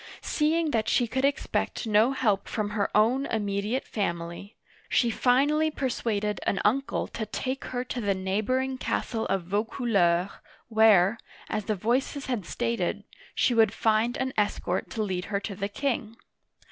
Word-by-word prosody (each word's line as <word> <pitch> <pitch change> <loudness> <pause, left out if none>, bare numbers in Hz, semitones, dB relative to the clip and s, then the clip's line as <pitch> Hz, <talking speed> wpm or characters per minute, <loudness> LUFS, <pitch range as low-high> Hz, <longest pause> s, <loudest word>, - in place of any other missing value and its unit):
Seeing 315 +1 +1
that 220 -3 0
she 245 - +3
could 260 +3 -2
expect 280 -3 -1
no 220 +3 +4
help 220 -7 +1
from 210 -2 -2
her 205 -1 0
own 250 +6 +3
immediate 210 +3 -1
family, 170 0 -4 0.3
she 235 -2 +3
finally 285 +7 +3
persuaded 225 -7 -2
an 195 - +1
uncle 270 +6 +1
to 220 -2 -5
take 260 +5 -3
her 250 -1 -3
to 250 -1 -4
the 200 -2 +1
neighboring 235 +8 -1
castle 225 -4 -2
of 195 -2 0
Vaucouleurs 200 +4 0
(vo - - -8
coo 245 +3 -6 0.5
ler'), - - -18 0.3
where, 220 -2 +5 0.3
as 215 -2 -2
the 215 - 0
voices 255 +7 -1
had 240 -9 -3
stated, 235 -1 -1 0.3
she 245 - +3
would 225 -3 +4
find 225 +3 +2
an 260 0 -2
escort 195 -3 -1
to 220 - -2
lead 185 -3 -2
her 200 -1 -1
to 200 0 -5
the 200 +1 -3
king. 230 -2 -2
220 Hz, 165 wpm, -27 LUFS, 205-255 Hz, 0.5 s, where